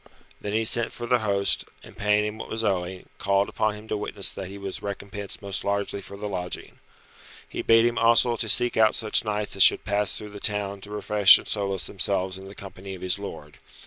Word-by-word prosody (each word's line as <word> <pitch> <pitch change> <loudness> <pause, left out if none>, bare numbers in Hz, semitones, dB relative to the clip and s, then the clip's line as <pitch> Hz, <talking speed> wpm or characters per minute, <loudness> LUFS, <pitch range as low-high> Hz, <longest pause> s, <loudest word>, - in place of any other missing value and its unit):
Then 105 - -4
he 110 +1 +1
sent 120 +1 +2
for 120 - -6
the 125 +1 +2
host, 100 -2 0 0.2
and - - -14
paying 105 0 +2
him 105 +1 -5
what - - -7
was 115 0 -2
owing, 95 -2 -2
called 100 0 +1
upon 110 -1 -1
him 105 +1 -12
to - - -1
witness 105 -1 -1
that 95 - -7
he 100 +2 -9
was 100 -1 -6
recompensed 100 0 -6
most 100 -1 -3
largely 100 0 -2
for 100 +1 -11
the 105 +1 -5
lodging. 90 -3 -5 0.7
He - - -5
bade 115 0 +5
him 120 0 0
also 115 +1 +4
to 110 -1 -2
seek 120 +4 +4
out 110 -1 +4
such 110 -2 0
knights 105 -2 -2
as - - 0
should - - +6
pass 105 -1 0
through 105 -1 -8
the 105 - -9
town 100 -1 -2
to 100 - -8
refresh 105 -1 +7
and - - -10
solace 100 -4 -2
themselves 95 0 -1
in 95 - -11
the 100 - -11
company 95 -1 -9
of 90 - -11
his 95 +2 0
lord. 75 -7 -9
100 Hz, 225 wpm, -25 LUFS, 100-105 Hz, 0.7 s, refresh